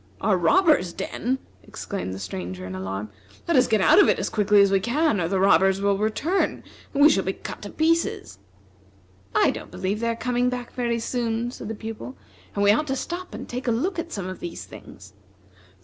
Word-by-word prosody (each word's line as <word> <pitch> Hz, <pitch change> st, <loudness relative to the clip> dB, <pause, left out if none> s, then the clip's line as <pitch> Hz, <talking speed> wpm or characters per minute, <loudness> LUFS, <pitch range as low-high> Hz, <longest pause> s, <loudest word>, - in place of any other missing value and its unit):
"A 205 Hz, -1 st, +2 dB
robber's 185 Hz, -, +3 dB
den!" 255 Hz, +3 st, -2 dB, 0.2 s
exclaimed 195 Hz, -, -6 dB
the 95 Hz, -, -5 dB
Stranger 95 Hz, -1 st, -6 dB
in 95 Hz, -, -6 dB
alarm; 95 Hz, +3 st, -5 dB, 0.4 s
"let 340 Hz, -, +2 dB
us 255 Hz, -, +5 dB
get 220 Hz, -2 st, +2 dB
out 310 Hz, -, +6 dB
of -, -, +4 dB
it -, -, +3 dB
as -, -, -2 dB
quickly 210 Hz, -1 st, +3 dB
as 200 Hz, -1 st, +5 dB
we 195 Hz, -, +4 dB
can, 240 Hz, -, +1 dB
or 165 Hz, -, 0 dB
the 190 Hz, +1 st, 0 dB
robbers 190 Hz, 0 st, +4 dB
will 200 Hz, 0 st, +2 dB
return, 220 Hz, -, 0 dB, 0.3 s
and 285 Hz, 0 st, +3 dB
we -, -, +10 dB
shall 195 Hz, -, +1 dB
be 190 Hz, -, -1 dB
cut -, -, -8 dB
to 205 Hz, -, -7 dB
pieces." 320 Hz, -, 0 dB, 1.0 s
"I -, -, +4 dB
don't -, -, -8 dB
believe 195 Hz, +3 st, -3 dB
they 230 Hz, -, -1 dB
are 230 Hz, -, -1 dB
coming 245 Hz, +1 st, 0 dB
back 250 Hz, -1 st, -5 dB
very 235 Hz, -2 st, -1 dB
soon," 235 Hz, 0 st, -2 dB
said -, -, -8 dB
the 225 Hz, -, -4 dB
Pupil, 210 Hz, -, -7 dB, 0.4 s
"and 200 Hz, -, +1 dB
we 205 Hz, -, +6 dB
ought 300 Hz, +9 st, +1 dB
to 270 Hz, -, -1 dB
stop 350 Hz, +6 st, -5 dB
and -, -, -7 dB
take 250 Hz, +1 st, -5 dB
a -, -, +3 dB
look 335 Hz, -, -1 dB
at 335 Hz, 0 st, -5 dB
some 195 Hz, -3 st, -4 dB
of 185 Hz, -, -6 dB
these 175 Hz, -, -6 dB
things." -, -, -13 dB
220 Hz, 215 wpm, -24 LUFS, 190-255 Hz, 1.0 s, we